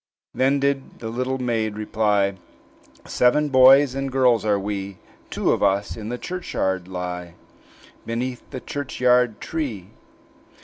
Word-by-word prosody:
Then 135 Hz, +2 st, +2 dB
did 140 Hz, -1 st, -1 dB
the 115 Hz, -, -6 dB
little 130 Hz, +3 st, -2 dB
maid 115 Hz, -4 st, -1 dB
reply, 105 Hz, -2 st, +1 dB, 0.7 s
"Seven 145 Hz, +5 st, +2 dB
boys 135 Hz, +1 st, +6 dB
and 135 Hz, 0 st, -3 dB
girls 125 Hz, -3 st, +3 dB
are 105 Hz, -2 st, +2 dB
we; 100 Hz, -1 st, -4 dB, 0.3 s
Two -, -, 0 dB
of -, -, 0 dB
us 100 Hz, +1 st, +1 dB
in 110 Hz, -1 st, -7 dB
the 125 Hz, -, -3 dB
churchyard 95 Hz, -, -3 dB
lie, 90 Hz, -2 st, -6 dB, 0.7 s
Beneath 125 Hz, +2 st, -3 dB
the 130 Hz, -, -7 dB
churchyard 125 Hz, -4 st, +1 dB
tree." 120 Hz, -, -5 dB
120 Hz, 130 wpm, -23 LUFS, 100-130 Hz, 0.7 s, boys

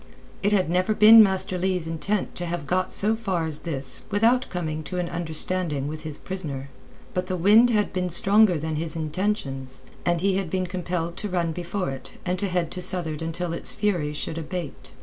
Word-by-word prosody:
It 205 Hz, -, +1 dB
had 190 Hz, -4 st, +2 dB
never 185 Hz, +5 st, +1 dB
been 220 Hz, +1 st, +9 dB
Master 190 Hz, -2 st, +2 dB
Leigh's 185 Hz, -2 st, -1 dB
intent 165 Hz, +5 st, -2 dB
to 175 Hz, -, -4 dB
have 170 Hz, -3 st, -4 dB
got 185 Hz, +5 st, -1 dB
so 215 Hz, +2 st, +2 dB
far 190 Hz, -7 st, -2 dB
as 155 Hz, -2 st, 0 dB
this 135 Hz, -6 st, +2 dB
without 230 Hz, +5 st, +2 dB
coming 160 Hz, -4 st, -4 dB
to 180 Hz, -, -5 dB
an 175 Hz, -1 st, -1 dB
understanding 165 Hz, -3 st, -2 dB
with 155 Hz, +1 st, -6 dB
his 155 Hz, -2 st, -6 dB
prisoner. 145 Hz, -8 st, -6 dB, 0.4 s
But 180 Hz, 0 st, -2 dB
the 185 Hz, -1 st, -2 dB
wind 210 Hz, +7 st, +5 dB
had 210 Hz, -3 st, 0 dB
been 180 Hz, -1 st, -1 dB
stronger 195 Hz, +2 st, +3 dB
than 155 Hz, 0 st, -3 dB
his 160 Hz, +1 st, -2 dB
intentions, 155 Hz, -5 st, -3 dB, 0.2 s
and 175 Hz, -1 st, +1 dB
he 190 Hz, +1 st, +1 dB
had 195 Hz, -4 st, -3 dB
been 185 Hz, +1 st, -1 dB
compelled 175 Hz, -1 st, -4 dB
to 210 Hz, -, -3 dB
run 175 Hz, -3 st, -1 dB
before 175 Hz, 0 st, -4 dB
it 135 Hz, -, -8 dB
and 180 Hz, 0 st, -1 dB
to 200 Hz, -, -1 dB
head 175 Hz, -3 st, -1 dB
to 185 Hz, -, -5 dB
southward 175 Hz, -4 st, -3 dB
until 165 Hz, +1 st, -3 dB
its 170 Hz, -, +8 dB
fury 175 Hz, -8 st, -1 dB
should 155 Hz, +2 st, -5 dB
abate. 155 Hz, -5 st, -6 dB
180 Hz, 200 wpm, -24 LUFS, 160-190 Hz, 0.4 s, been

